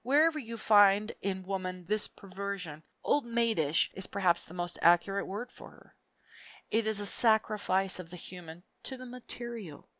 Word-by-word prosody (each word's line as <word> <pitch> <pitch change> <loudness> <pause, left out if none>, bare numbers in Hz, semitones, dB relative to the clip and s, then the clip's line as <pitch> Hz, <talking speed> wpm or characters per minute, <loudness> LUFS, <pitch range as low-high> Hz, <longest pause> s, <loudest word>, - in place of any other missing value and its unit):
Wherever 305 +5 +4
you 230 -4 -7
find 205 0 +5
in 190 -1 -2
woman 185 -1 -4
this 210 +4 0
perversion 195 -5 -6 0.2
old 290 - +2
maidish 230 -10 +2
is 190 - -4
perhaps 185 -4 +1
the 170 - -13
most 175 0 -3
accurate 175 +3 +4
word 220 +6 -5
for - - -12
her - - -20 0.8
it 225 0 +2
is 220 -1 +1
a 205 - -2
sacrifice 210 -4 +2
of 170 -2 -8
the 180 - -8
human 175 -1 -10 0.2
to 265 - -5
the 255 - -9
material. 235 -8 -8
200 Hz, 160 wpm, -31 LUFS, 180-230 Hz, 0.8 s, find